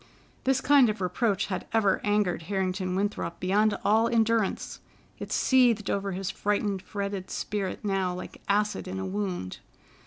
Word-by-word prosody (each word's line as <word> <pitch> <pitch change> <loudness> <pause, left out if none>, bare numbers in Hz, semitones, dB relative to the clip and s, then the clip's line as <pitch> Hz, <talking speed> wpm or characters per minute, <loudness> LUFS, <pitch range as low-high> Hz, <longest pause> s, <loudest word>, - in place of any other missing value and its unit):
This 265 0 +2
kind 280 -4 +5
of 215 - -3
reproach 195 +2 0
had 185 -3 -4
ever 210 -4 +3
angered 205 -4 +1
Harrington 185 -1 -1
Winthrop 195 -4 -2
beyond 205 +3 +2
all 220 +2 +4
endurance. 230 -3 0 0.4
It - - -7
seethed 245 -5 +3
over 195 -1 -1
his 190 +1 -3
frightened, 205 -1 -1
fretted 200 -2 -4
spirit 205 0 -3
now 195 -2 0
like 180 - -9
acid 210 0 +1
in 185 +1 -4
a 190 - -3
wound. 190 - -3
200 Hz, 150 wpm, -27 LUFS, 190-215 Hz, 0.4 s, kind